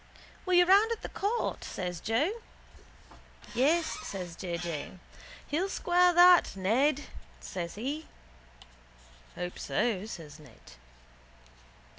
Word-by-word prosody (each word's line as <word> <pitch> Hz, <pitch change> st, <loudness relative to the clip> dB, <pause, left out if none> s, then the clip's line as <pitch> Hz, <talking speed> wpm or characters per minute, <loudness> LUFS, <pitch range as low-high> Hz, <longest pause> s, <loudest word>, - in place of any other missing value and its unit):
—Were 370 Hz, -, +1 dB
you 355 Hz, 0 st, +6 dB
round 400 Hz, +5 st, +5 dB
at 460 Hz, -, -4 dB
the -, -, -5 dB
court? 430 Hz, +4 st, -2 dB
says 180 Hz, -2 st, -5 dB
Joe. 235 Hz, -, 0 dB, 1.2 s
—Yes, 315 Hz, +7 st, +1 dB
says 180 Hz, -4 st, -6 dB
J. 175 Hz, -2 st, -4 dB
J. 170 Hz, -3 st, -5 dB, 0.5 s
He'll 345 Hz, +7 st, -1 dB
square 360 Hz, -1 st, +3 dB
that, 355 Hz, -, +6 dB
Ned, 255 Hz, +10 st, +2 dB, 0.4 s
says 170 Hz, -2 st, -6 dB
he. 280 Hz, +9 st, -4 dB, 1.3 s
—Hope 180 Hz, 0 st, -5 dB
so, 215 Hz, -4 st, -1 dB
says 155 Hz, -7 st, -9 dB
Ned. 150 Hz, -, -17 dB
255 Hz, 110 wpm, -30 LUFS, -, 1.3 s, you